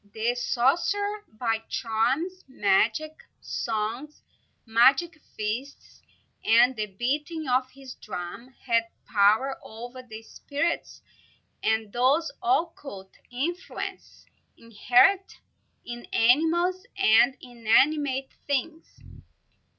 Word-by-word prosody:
The 225 +2 0
sorcerer, 350 - 0
by 225 0 -1
charms, 260 +12 -1
magic 235 - +1 0.2
songs, 230 +7 -4 0.4
magic 270 +8 +3 0.2
feasts, 225 +7 -5 0.4
and 240 +3 +5
the 215 -1 -2
beating 290 - -3
of 255 +1 +1
his 265 -1 -11
drum, 195 +4 -7 0.2
had 230 -2 +2 0.2
power 220 +6 +2
over 240 +3 -9
the 225 -3 -11
spirits 285 +8 -3 0.6
and 220 -2 0
those 270 +7 +2
occult 320 - -2 0.2
influences 330 +9 -5 0.3
inherent 245 - +2 0.5
in 240 0 -7
animals 330 +10 +2
and 245 - +4
inanimate 265 +3 +1 0.2
things. 290 +4 -3
255 Hz, 90 wpm, -26 LUFS, 225-310 Hz, 0.6 s, and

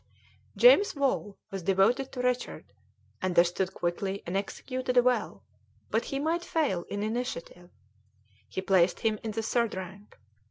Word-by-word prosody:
James 485 -7 +6
Wall 265 -7 -1
was 195 -1 -4
devoted 195 +9 +2
to 250 -2 -4
Richard, 250 0 -2 0.5
understood 180 +1 +2
quickly 190 +3 -2
and 175 - -4
executed 255 +6 -3
well, 245 0 +2 0.5
but - - +1
he 275 - -3
might 325 +4 0
fail 285 - 0
in 205 0 -3
initiative; 215 -6 -4 0.8
he 190 - -3
placed 185 -2 +3
him 220 -2 0
in 225 - -4
the 220 +1 -3
third 235 -1 0
rank. 190 +2 -9
215 Hz, 135 wpm, -29 LUFS, 190-255 Hz, 0.8 s, James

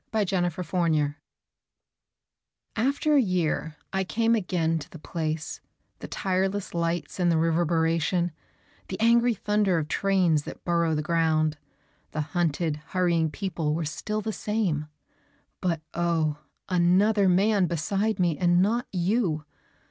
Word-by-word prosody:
IN - - +3
A 185 -3 +1
SUBWAY 180 +2 -5 0.3
STATION 150 -2 +1 1.6
AFTER 280 +6 +1
a - - +6
year 170 -6 -1 0.2
I 190 0 +1
came 230 +4 +1
again 175 -6 0
to 150 - -10
the - - -10
place; 155 0 -4 0.4
The - - -7
tireless 190 +1 -1
lights 170 +1 -2
and 175 -1 +3
the 165 - +2
reverberation, 165 +1 +1 0.6
The - - -5
angry 235 +1 +4
thunder 205 -2 +1
of 155 -2 -1
trains 185 -6 +2
that - - -9
burrow 170 -2 +2
the 150 - -1
ground, 155 -2 +1 0.5
The 155 - -1
hunted, 160 -1 -1
hurrying 165 +1 0
people 165 -3 -2
were 165 0 -2
still 215 +8 -3
the 220 +1 -3
same 195 -10 -1 0.7
But 170 -3 0
oh, 165 -3 0 0.3
another 190 +3 +3
man 195 +1 +3
beside 195 +7 -1
me 170 -4 +1
and 175 -1 +4
not 225 +6 +1
you! 180 -4 0
175 Hz, 135 wpm, -26 LUFS, 160-195 Hz, 1.6 s, a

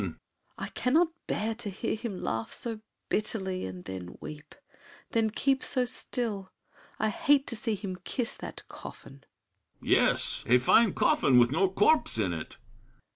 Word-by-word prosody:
SAVERNY. - - -4 0.4
I - - -4
cannot 315 +8 +3 0.2
bear 220 +2 -1
to 220 -2 -5
hear 200 +4 -2
Him 220 -4 -5
laugh 115 0 -2
so 225 -3 -4 0.3
bitterly, 190 - -1
then 90 -1 -7
weep; 150 0 -9 0.6
then 225 -1 +2
keep 270 +4 +1
So 255 -2 +2
still! 225 -5 -3 0.5
I 215 - +1
hate 290 +2 +3
to 235 - -2
see 225 -1 -1
him 190 -2 -5
kiss 230 +6 -3
that - - -7
coffin. 135 0 -11 0.6
BRICHANTEAU. - - -10
Yes—a 125 - +3
fine 195 - +4
coffin 130 -2 +4
with 120 0 +6
no 190 +6 +3
corpse 210 - +3
in 95 -5 +1
it! 80 -2 -6
205 Hz, 150 wpm, -29 LUFS, -, 0.6 s, with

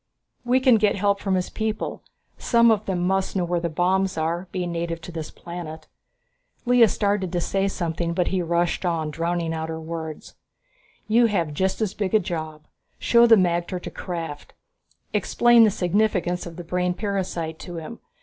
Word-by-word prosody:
We 250 +1 +3
can 255 -3 +5
get 205 -1 +3
help 200 0 +1
from 195 -2 0
his 180 -1 -2
people. 220 -1 -3 0.4
Some 235 -1 +4
of 215 -1 0
them 185 -2 -1
must 190 +1 0
know 180 -2 +1
where 175 0 0
the 170 0 -2
bombs 185 +3 +1
are, 170 +3 -1
being 180 -2 -3
native 170 0 -3
to 175 - -9
this 160 -2 -5
planet." 170 -2 -8 0.8
Lea 245 -1 +6
started 200 -3 0
to 175 - 0
say 195 +3 0
something, 170 -2 -2
but 180 -1 +1
he 190 -1 0
rushed 170 +1 0
on, 165 -4 -1
drowning 165 +1 -1
out 160 0 -4
her 160 0 -4
words. 160 -1 -7 0.7
"You 230 +2 +4
have 170 -8 -1
just 190 +7 -1
as 205 -3 0
big 205 -1 -1
a - - +6
job. 155 -4 -5 0.3
Show 235 0 +5
the 225 - +8
magter 175 -1 0
to - - -8
Krafft, 165 -5 -6 0.6
explain 240 -1 +5
the - - +4
significance 180 -2 0
of 170 - -9
the 175 - -7
brain 180 +1 -1
parasite 180 -5 -3
to 175 - -8
him. 165 +8 -7
180 Hz, 180 wpm, -24 LUFS, 170-200 Hz, 0.8 s, the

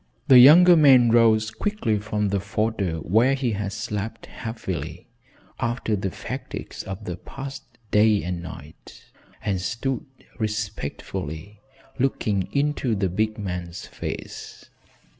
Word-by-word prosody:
The 130 -2 +10
younger 175 +7 +9
man 130 -7 +6
rose 110 -2 +4
quickly 115 - -1
from 105 0 -1
the 100 0 0
fodder 105 -3 -1
where 115 - +3
he 130 -3 -1
had 100 -1 -3
slept 105 +1 -5
heavily 110 -6 -6 0.5
after 115 -2 -1
the 95 -1 -2
fatigues - - -7
of 95 +2 -7
the 90 -1 -4
past 135 +8 -8 0.3
day 105 0 +4
and 90 -1 -3
night, 80 -3 -12 0.3
and 95 -3 0
stood 125 - -3 0.3
respectfully 105 -4 -4 0.4
looking 105 -7 0
into 140 -4 0
the 95 -2 0
big 110 +4 -1
man's 90 -4 -5
face. - - -8
110 Hz, 120 wpm, -24 LUFS, 95-120 Hz, 0.5 s, The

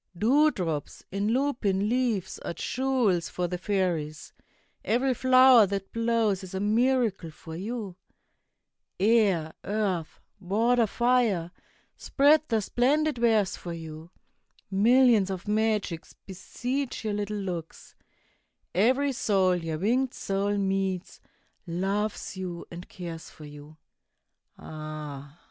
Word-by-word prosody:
Dewdrops 210 - +1
in 200 +2 -1
lupin 225 -6 0
leaves 230 -6 -1
are - - -6
jewels 245 -10 0
for 180 -1 -2
the 180 0 -4
fairies; 175 -6 -2 0.5
Every 250 +5 +1
flower 255 -3 +6
that 195 0 -4
blows 230 -4 +1
is 190 0 -8
a - - -1
miracle 220 -3 +1
for 160 +1 -10
you. 205 0 -5 1.0
Air, 195 -7 +2
earth, 195 -6 -2 0.2
water, 225 +5 +2
fire, 230 -8 +1 0.5
spread 295 +2 +4
their 225 -2 +1
splendid 275 +6 +1
wares 220 -5 +2
for 175 - -7
you. 160 0 -9 0.6
Millions 225 0 +4
of 190 +1 -5
magics 210 -5 -1
beseech 245 +7 -4
your 215 - -1
little 210 0 -3
looks; 175 -5 -6 0.8
Every 260 +9 +2
soul 195 -7 +2
your 165 -2 -3
winged 245 +8 0
soul 200 +1 -1
meets, 190 -2 -2 0.5
loves 200 +5 -2
you 180 -2 -6
and 175 +1 -9
cares 170 -3 -8
for 155 - -13
you. 150 +1 -12 0.8
Ah! 150 -2 -8
200 Hz, 115 wpm, -27 LUFS, 175-235 Hz, 1.0 s, flower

